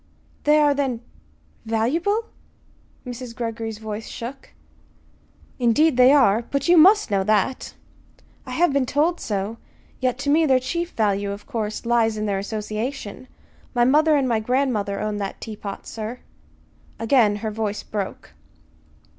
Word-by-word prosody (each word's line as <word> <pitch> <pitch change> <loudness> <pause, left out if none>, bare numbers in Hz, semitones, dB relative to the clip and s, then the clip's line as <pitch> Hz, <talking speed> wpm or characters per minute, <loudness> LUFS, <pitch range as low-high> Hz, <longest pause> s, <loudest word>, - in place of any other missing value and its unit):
"They 300 +1 +5
are, 295 -1 +4
then 265 -5 -1 0.6
valuable?" 315 - 0 0.8
Mrs. 245 -1 -7
Greggory's 225 -2 -4
voice 220 0 -6
shook. 260 +4 -8 1.1
"Indeed 255 +5 +3
they 250 +1 +7
are! 240 -7 +5
But 280 +2 -1
you 350 - +6
must 380 - +6
know 195 -1 +2
that." 215 +5 0 0.7
"I - - -7
have 345 -3 +2
been 275 -2 +1
told 320 +6 +1
so. 205 +2 -3 0.4
Yet 255 -1 0
to 285 +1 -1
me 315 +1 +4
their 260 -2 +4
chief 340 +7 -3
value, 200 -2 0
of 200 +1 -8
course, 220 -4 -4
lies 230 -2 +2
in 215 - -2
their 200 -2 0
association. 215 +4 -5 0.5
My 240 - +4
mother 305 +4 +4
and 275 -3 +2
my 230 -3 +1
grandmother 220 -4 0
owned 210 -1 -2
that 195 -1 -4
teapot, 210 -3 -7
sir." 225 +3 -6 0.8
Again 225 -3 +3
her 215 - -1
voice 210 -1 -3
broke. 200 -3 -5
235 Hz, 145 wpm, -23 LUFS, 215-280 Hz, 1.1 s, they